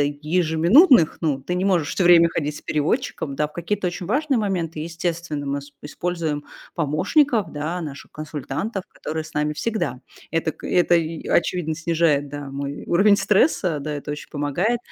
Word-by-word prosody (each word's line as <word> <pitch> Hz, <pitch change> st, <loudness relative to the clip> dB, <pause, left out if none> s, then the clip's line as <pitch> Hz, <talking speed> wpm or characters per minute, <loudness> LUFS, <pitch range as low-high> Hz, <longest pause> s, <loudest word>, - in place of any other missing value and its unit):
ежеминутных, 160 Hz, -, +4 dB
ну, 145 Hz, -5 st, -1 dB
ты 180 Hz, -, -3 dB
не 185 Hz, -, 0 dB
можешь 175 Hz, -7 st, +2 dB
всё 185 Hz, -, 0 dB
время 170 Hz, -1 st, +7 dB
ходить 150 Hz, -2 st, -3 dB
с -, -, -10 dB
переводчиком, 155 Hz, -, -1 dB
да? 150 Hz, +1 st, 0 dB
В -, -, -22 dB
какие-то 185 Hz, +3 st, -2 dB
очень 175 Hz, 0 st, -6 dB
важные 275 Hz, +4 st, +1 dB
моменты, 180 Hz, -7 st, -2 dB
естественно, 165 Hz, -2 st, -3 dB
мы 140 Hz, +1 st, -1 dB
с 145 Hz, +1 st, -14 dB
используем 155 Hz, -1 st, -3 dB, 0.3 s
помощников, 195 Hz, -, +2 dB
да, 155 Hz, +4 st, -3 dB
наших 145 Hz, -3 st, -8 dB
консультантов, 155 Hz, -, -4 dB
которые 155 Hz, 0 st, -5 dB
с -, -, -13 dB
нами 150 Hz, 0 st, 0 dB
всегда. 150 Hz, -, -2 dB, 0.3 s
Это 165 Hz, 0 st, 0 dB
к -, -, -16 dB
это 175 Hz, -1 st, +3 dB
и 165 Hz, -1 st, -1 dB
а, -, -, 0 dB
очевидно, 170 Hz, -2 st, -2 dB
снижает, 160 Hz, -3 st, +1 dB
да, 145 Hz, -1 st, -7 dB
мой 140 Hz, +1 st, -5 dB
уровень 200 Hz, +4 st, +5 dB
стресса. 195 Hz, -, +2 dB
Да, 150 Hz, +1 st, -4 dB
это 145 Hz, 0 st, -5 dB
очень 150 Hz, -, -8 dB
помогает, 155 Hz, +11 st, 0 dB
165 Hz, 175 wpm, -22 LUFS, 150-180 Hz, 0.3 s, время